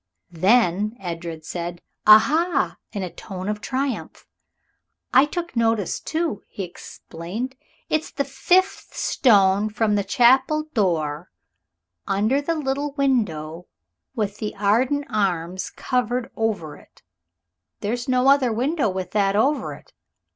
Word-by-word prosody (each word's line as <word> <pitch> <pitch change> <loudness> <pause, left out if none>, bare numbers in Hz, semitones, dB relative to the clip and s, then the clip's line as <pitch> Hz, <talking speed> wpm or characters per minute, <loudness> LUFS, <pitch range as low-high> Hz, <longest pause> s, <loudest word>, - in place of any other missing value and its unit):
Then 205 +3 +2
Edred 170 -3 -6
said, 175 +1 -5 0.3
"Aha!" 290 +8 +5
in 200 - -4
a 180 - -5
tone 190 -2 -7
of 210 0 -2
triumph. 265 0 -3 0.9
"I 260 +3 +7
took 340 0 -5
notice, 225 -4 +1
too," 320 - -2
he 195 - -6
explained. 180 +6 -7 0.3
"It's 310 0 -1
the 280 - -2
fifth 350 +8 +1
stone 200 -3 +3
from 215 0 0
the 205 -1 +1
chapel 260 +8 +4
door 165 - 0 0.8
under 215 +8 +1
the 330 +3 -1
little 285 -1 -2
window 180 - -1 0.5
with 210 -2 -2
the 210 - -4
Arden 245 +8 +1
arms 185 -3 -1
carved 250 -1 -2
over 210 -9 -2
it. - - -22 0.8
There's 240 +5 -3
no 255 +1 +3
other 275 -3 +5
window 265 +3 0
with 185 -1 -4
that 200 -1 +2
over 275 +8 +1
it. - - -19
215 Hz, 125 wpm, -23 LUFS, 190-265 Hz, 0.9 s, I